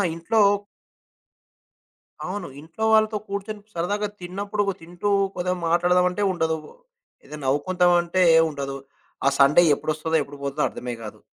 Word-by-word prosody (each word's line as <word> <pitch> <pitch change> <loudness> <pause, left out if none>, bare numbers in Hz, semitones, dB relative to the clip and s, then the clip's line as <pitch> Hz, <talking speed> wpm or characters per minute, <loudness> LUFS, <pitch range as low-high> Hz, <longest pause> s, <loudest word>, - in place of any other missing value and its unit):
ఇంట్లో 215 +7 +1 1.8
అవును. 185 0 -4
ఇంట్లో 165 +8 -7
వాళ్ళతో 215 0 +3
కూర్చొని 200 +1 -5
సరదాగా 205 +5 -1
తిన్నప్పుడు 200 +3 -3 0.2
తింటూ 175 +5 -4 0.3
కొదిగా 180 0 -1
మాట్లాడదం 175 +2 +3
అంటే 190 +3 -2
ఉండదు, 160 -2 0 0.7
ఏదే 150 - -9
నవ్వుకుందామంటే 175 +5 +2 0.3
ఉండదు. 140 -2 -5 0.5
ఆ - - +5
సండే 140 +5 +6
ఎప్పుడొస్తదో 155 +2 -2
ఎప్పుడు 140 +1 -12
పోతదో 140 +2 -2
అర్థమే 125 -1 -6
కాదు. 105 - -9
175 Hz, 115 wpm, -24 LUFS, 155-200 Hz, 1.8 s, సండే